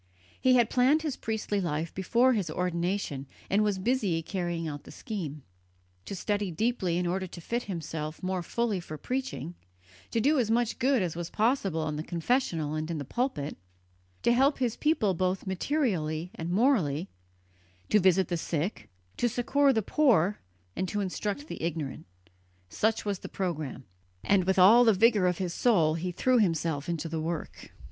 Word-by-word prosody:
He 255 Hz, -1 st, +5 dB
had 240 Hz, -3 st, +3 dB
planned 270 Hz, +5 st, +4 dB
his 300 Hz, -4 st, -2 dB
priestly 215 Hz, -2 st, -2 dB
life 160 Hz, -1 st, -2 dB
before 235 Hz, +7 st, +3 dB
his 200 Hz, -8 st, -1 dB
ordination, 170 Hz, -4 st, -2 dB, 0.2 s
and 205 Hz, +2 st, +4 dB
was 205 Hz, -2 st, +1 dB
busy 190 Hz, -6 st, 0 dB
carrying 175 Hz, -3 st, -3 dB
out 145 Hz, -2 st, -6 dB
the -, -, -14 dB
scheme. 155 Hz, -, -6 dB, 0.6 s
To 200 Hz, -, -5 dB
study 205 Hz, +1 st, -1 dB
deeply 185 Hz, -1 st, 0 dB
in 180 Hz, -, 0 dB
order 185 Hz, +2 st, -1 dB
to 175 Hz, -, -10 dB
fit 235 Hz, +8 st, -3 dB
himself 160 Hz, -3 st, -5 dB
more 185 Hz, 0 st, -1 dB
fully 220 Hz, +2 st, -1 dB
for 155 Hz, -3 st, -8 dB
preaching; 260 Hz, -, -4 dB, 0.6 s
to 230 Hz, -, 0 dB
do 285 Hz, +5 st, +3 dB
as 230 Hz, -4 st, +1 dB
much 235 Hz, 0 st, +1 dB
good 260 Hz, -4 st, +3 dB
as 170 Hz, -3 st, -3 dB
was 170 Hz, 0 st, -4 dB
possible 200 Hz, -, +1 dB
in 150 Hz, -1 st, -3 dB
the 155 Hz, -, -3 dB
confessional 170 Hz, -, 0 dB
and 155 Hz, +1 st, -3 dB
in 165 Hz, -, -2 dB
the 145 Hz, -, -4 dB
pulpit; 170 Hz, -, -2 dB, 0.7 s
to 235 Hz, -, +4 dB
help 270 Hz, +4 st, +3 dB
his 245 Hz, -3 st, 0 dB
people 300 Hz, -, +2 dB
both 185 Hz, +2 st, -1 dB
materially 185 Hz, -, -1 dB
and 165 Hz, +1 st, -5 dB
morally, 185 Hz, -, +2 dB, 0.8 s
to 210 Hz, -, +5 dB
visit 185 Hz, -1 st, +4 dB
the 175 Hz, -, -1 dB
sick, 165 Hz, +4 st, -3 dB, 0.3 s
to 240 Hz, -, +2 dB
succour 275 Hz, +4 st, +2 dB
the 220 Hz, -4 st, +1 dB
poor 210 Hz, -, +3 dB, 0.4 s
and 185 Hz, -, -1 dB
to 210 Hz, -, -2 dB
instruct 205 Hz, +7 st, -3 dB
the -, -, -7 dB
ignorant 160 Hz, -, -4 dB, 0.6 s
such 220 Hz, -, 0 dB
was 200 Hz, -3 st, -1 dB
the -, -, -8 dB
programme, 155 Hz, -8 st, -4 dB, 0.4 s
and 195 Hz, -3 st, +3 dB
with 190 Hz, +1 st, +1 dB
all 210 Hz, +7 st, +8 dB
the 225 Hz, -2 st, +5 dB
vigour 210 Hz, -2 st, +4 dB
of 180 Hz, -, 0 dB
his 180 Hz, -3 st, -2 dB
soul 170 Hz, -11 st, +3 dB
he 175 Hz, +3 st, -3 dB
threw 250 Hz, +7 st, +2 dB
himself 165 Hz, -6 st, 0 dB
into 165 Hz, -1 st, -2 dB
the 160 Hz, -1 st, -3 dB
work. 165 Hz, 0 st, -5 dB
190 Hz, 175 wpm, -29 LUFS, 165-235 Hz, 0.8 s, all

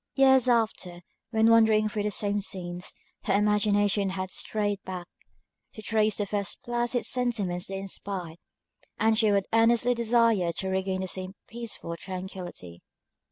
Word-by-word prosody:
Years 265 Hz, -2 st, +5 dB
after, 215 Hz, -7 st, 0 dB, 0.3 s
when 225 Hz, 0 st, +4 dB
wandering 220 Hz, -1 st, +5 dB
through 210 Hz, 0 st, -3 dB
the 210 Hz, -, 0 dB
same 205 Hz, 0 st, 0 dB
scenes, 180 Hz, -3 st, -4 dB, 0.3 s
her -, -, +2 dB
imagination 205 Hz, -1 st, +2 dB
has 185 Hz, 0 st, -4 dB
strayed 205 Hz, -2 st, -2 dB
back, 185 Hz, -2 st, -6 dB, 0.7 s
to 215 Hz, -, -10 dB
trace 215 Hz, -2 st, +2 dB
the 205 Hz, -, -1 dB
first 200 Hz, -1 st, -3 dB
placid 240 Hz, 0 st, -1 dB
sentiments 210 Hz, -8 st, -1 dB
they 195 Hz, -, -4 dB
inspired, 190 Hz, -3 st, -5 dB, 0.6 s
and 220 Hz, 0 st, +3 dB
she 215 Hz, -1 st, +3 dB
would 200 Hz, -1 st, +2 dB
earnestly 235 Hz, +2 st, +4 dB
desire 230 Hz, -6 st, +2 dB
to 190 Hz, -, -3 dB
regain 190 Hz, 0 st, -1 dB
the 190 Hz, -, -3 dB
same 185 Hz, +1 st, -5 dB
peaceful 230 Hz, -7 st, -5 dB
tranquillity. 180 Hz, -, -7 dB
205 Hz, 145 wpm, -27 LUFS, 190-225 Hz, 0.7 s, Years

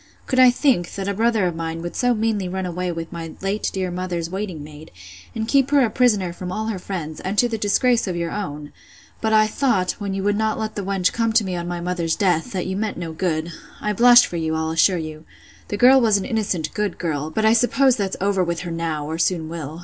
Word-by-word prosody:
Could 255 Hz, -, 0 dB
I 255 Hz, -1 st, +8 dB
think, 245 Hz, -, +1 dB
that 195 Hz, -1 st, -4 dB
a 200 Hz, -, 0 dB
brother 220 Hz, -1 st, +1 dB
of 175 Hz, -2 st, -1 dB
mine 165 Hz, 0 st, -4 dB
would 175 Hz, -, -6 dB
so 245 Hz, -1 st, +2 dB
meanly 215 Hz, -4 st, -1 dB
run 190 Hz, +1 st, -3 dB
away 180 Hz, 0 st, -3 dB
with 165 Hz, -1 st, -6 dB
my 165 Hz, -2 st, -7 dB
late 195 Hz, +2 st, -1 dB
dear 185 Hz, -2 st, -3 dB
mother's 175 Hz, -2 st, -3 dB
waiting 190 Hz, -6 st, -4 dB
maid, 150 Hz, +1 st, -12 dB, 0.5 s
and 220 Hz, -1 st, -2 dB
keep 275 Hz, +1 st, +3 dB
her 285 Hz, -1 st, +4 dB
a 220 Hz, -, -3 dB
prisoner 210 Hz, -8 st, +2 dB
from 180 Hz, 0 st, -6 dB
all 220 Hz, +3 st, -3 dB
her 205 Hz, -4 st, -3 dB
friends, 170 Hz, -5 st, -5 dB
and 195 Hz, +3 st, -4 dB
to 245 Hz, -, +4 dB
the 230 Hz, -, -3 dB
disgrace 230 Hz, +3 st, +2 dB
of 180 Hz, -, -2 dB
your 170 Hz, -1 st, -2 dB
own? 150 Hz, -8 st, -5 dB, 0.5 s
But 220 Hz, -, 0 dB
I 215 Hz, 0 st, +5 dB
thought, 215 Hz, -5 st, +1 dB
when 200 Hz, -2 st, -3 dB
you 195 Hz, -, -3 dB
would 205 Hz, 0 st, +1 dB
not 220 Hz, 0 st, 0 dB
let 220 Hz, -1 st, -3 dB
the 205 Hz, -, -4 dB
wench 190 Hz, -1 st, 0 dB
come 230 Hz, -1 st, 0 dB
to 220 Hz, -, +4 dB
me 185 Hz, -2 st, -3 dB
on 175 Hz, 0 st, -4 dB
my 175 Hz, 0 st, -4 dB
mother's 170 Hz, -2 st, -1 dB
death, 185 Hz, +1 st, +1 dB
that 185 Hz, -3 st, -3 dB
you 190 Hz, -, -3 dB
meant 215 Hz, +1 st, -2 dB
no 170 Hz, -2 st, -5 dB
good.—I 170 Hz, +4 st, -3 dB
blush 240 Hz, +3 st, +7 dB
for 175 Hz, -, -5 dB
you, 160 Hz, -1 st, -1 dB
I'll 160 Hz, 0 st, -1 dB
assure 180 Hz, +3 st, +3 dB
you. 155 Hz, -1 st, -6 dB, 0.4 s
The 205 Hz, -, -3 dB
girl 260 Hz, +4 st, +6 dB
was 220 Hz, -3 st, +4 dB
an 195 Hz, -, -4 dB
innocent, 200 Hz, -, -2 dB
good 210 Hz, -3 st, -2 dB
girl; 155 Hz, -3 st, -2 dB
but 215 Hz, +7 st, -1 dB
I 220 Hz, -, +6 dB
suppose 250 Hz, +2 st, +3 dB
that's 195 Hz, -3 st, -2 dB
over 195 Hz, -1 st, +1 dB
with 170 Hz, -1 st, -2 dB
her 175 Hz, -1 st, -5 dB
now, 165 Hz, -3 st, -3 dB
or 160 Hz, +2 st, -4 dB
soon 165 Hz, -1 st, 0 dB
will. 160 Hz, -1 st, -6 dB
190 Hz, 250 wpm, -22 LUFS, 170-220 Hz, 0.5 s, I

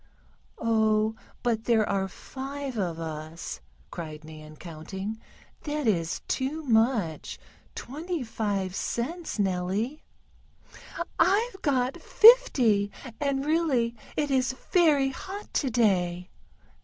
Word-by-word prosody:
"Oh, 220 Hz, -1 st, +2 dB, 0.3 s
but 230 Hz, -2 st, 0 dB
there 225 Hz, -3 st, +3 dB
are 195 Hz, -1 st, 0 dB
five 270 Hz, +6 st, -6 dB
of 180 Hz, -6 st, -1 dB
us!" 160 Hz, -, -6 dB, 0.3 s
cried 155 Hz, -2 st, -7 dB
Nan, 155 Hz, 0 st, -11 dB
counting. 190 Hz, +7 st, -6 dB, 0.4 s
"That 295 Hz, -1 st, -2 dB
is 170 Hz, -7 st, +1 dB
too 290 Hz, +5 st, -1 dB
much 225 Hz, -, +1 dB, 0.4 s
twenty 315 Hz, +3 st, -4 dB
five 205 Hz, -5 st, -2 dB
cents, 310 Hz, -, -3 dB
Nellie." 195 Hz, +8 st, -1 dB, 1.2 s
"I've 395 Hz, +4 st, +2 dB
got 270 Hz, +2 st, 0 dB
fifty, 425 Hz, -, +6 dB, 0.3 s
and 280 Hz, -1 st, 0 dB
really 290 Hz, -7 st, +1 dB, 0.2 s
it 295 Hz, -1 st, 0 dB
is 260 Hz, -1 st, +2 dB, 0.2 s
very 300 Hz, -6 st, +4 dB
hot 385 Hz, +9 st, -8 dB
today." 190 Hz, -, +1 dB
230 Hz, 100 wpm, -27 LUFS, 190-285 Hz, 1.2 s, fifty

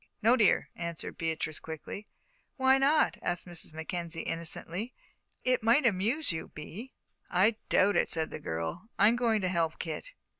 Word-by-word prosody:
"No, 235 Hz, +3 st, +6 dB
dear," 215 Hz, -6 st, +3 dB
answered 170 Hz, -1 st, -5 dB
Beatrice, 160 Hz, -1 st, -2 dB
quickly. 160 Hz, +6 st, -7 dB, 0.5 s
"Why 265 Hz, 0 st, +5 dB
not?" 295 Hz, +3 st, +3 dB
asked 175 Hz, 0 st, -2 dB
Mrs. 175 Hz, -3 st, -5 dB
Mackenzie, 165 Hz, +1 st, -4 dB
innocently; 170 Hz, +7 st, -4 dB, 0.5 s
"it 255 Hz, -1 st, +2 dB
might 235 Hz, +6 st, +4 dB
amuse 230 Hz, +7 st, +2 dB
you, 160 Hz, -, -4 dB
Bee." 205 Hz, +12 st, -9 dB, 0.4 s
"I 205 Hz, +5 st, +3 dB
doubt 200 Hz, +2 st, +4 dB
it," -, -, +3 dB
said 160 Hz, -1 st, 0 dB
the -, -, -5 dB
girl. 80 Hz, -, -4 dB
"I'm 210 Hz, +4 st, +6 dB
going 230 Hz, -3 st, +2 dB
to 185 Hz, -, +1 dB
help 170 Hz, -3 st, 0 dB
Kit." 175 Hz, -, -5 dB
185 Hz, 155 wpm, -30 LUFS, 165-235 Hz, 0.5 s, No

